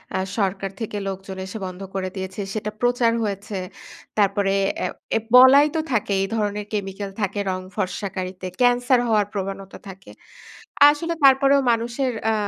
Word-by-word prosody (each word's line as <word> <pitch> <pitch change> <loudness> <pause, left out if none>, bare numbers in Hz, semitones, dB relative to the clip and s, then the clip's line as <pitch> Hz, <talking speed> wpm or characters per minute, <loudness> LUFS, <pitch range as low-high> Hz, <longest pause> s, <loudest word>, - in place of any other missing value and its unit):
আ - - +1 0.2
সরকার 195 -1 -1
থেকে 210 -1 -4
লোকজন 190 0 -6
এসে 205 +4 -7
বন্ধ 185 +1 -8
করে 185 -1 -2
দিয়েছে। 190 +1 -5
সেটা 210 0 -3
প্রচার 245 -1 +2
হয়েছে। 200 0 -4 0.6
তারপরে 200 -1 +2 0.3
অ্যা - - -1 0.3
এ - - +1 0.2
বলাই 265 +3 +8
তো - - +1
থাকে 210 -2 0
এই 195 - 0
ধরনের 210 -1 -2
কেমিক্যাল 195 -1 -4
থাকে 200 +1 -1
রং 185 0 -3 0.2
ফর্সাকারিতে, 185 -1 -4 0.2
ক্যান্সার 245 +1 +4
হওয়ার 210 -2 +3
প্রবণতা 195 0 -5
থাকে। 190 +1 -12 0.8
আসলে 330 +3 -1
তারপরেও 275 +1 +5
মানুষের 235 +3 -1 0.2
আ - - +1
205 Hz, 150 wpm, -22 LUFS, 195-240 Hz, 0.8 s, বলাই